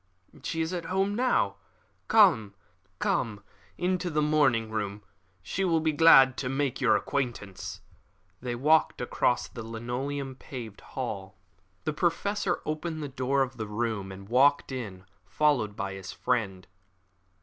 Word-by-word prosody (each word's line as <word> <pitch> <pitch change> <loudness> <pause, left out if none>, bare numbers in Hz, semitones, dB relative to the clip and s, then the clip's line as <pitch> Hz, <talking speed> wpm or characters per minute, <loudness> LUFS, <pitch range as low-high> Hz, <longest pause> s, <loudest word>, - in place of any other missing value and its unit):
"She 165 - -2
is 160 +3 -2
at 175 -2 -3
home 195 +2 0
now. 250 +4 +1 0.5
Come 160 - +5 1.2
into 180 0 0
the 155 -2 +1
morning 135 -8 +2
room. 105 -1 -3 0.4
She 195 - -2
will 170 -3 +3
be 160 0 +1
glad 135 -4 +7
to 130 - -2
make 135 -1 -1
your - - +5
acquaintance." 120 -8 -3 0.6
They 120 -1 -3
walked 155 +6 +3
across 125 0 +1
the 115 - -8
linoleum 125 +4 -4
paved 120 -8 -8
hall. 100 -7 -6 0.5
The 155 - -1
Professor 180 +4 0
opened 155 0 -3
the 145 - -4
door 135 +1 +1
of 130 -1 -6
the 110 -2 -4
room, 105 -2 -2
and 95 +1 -10
walked 135 +5 +4
in, 100 -8 -6 0.2
followed 120 -1 +1
by 100 -1 -3
his 95 -1 -7
friend. 95 -7 -1
130 Hz, 140 wpm, -28 LUFS, 110-155 Hz, 1.2 s, glad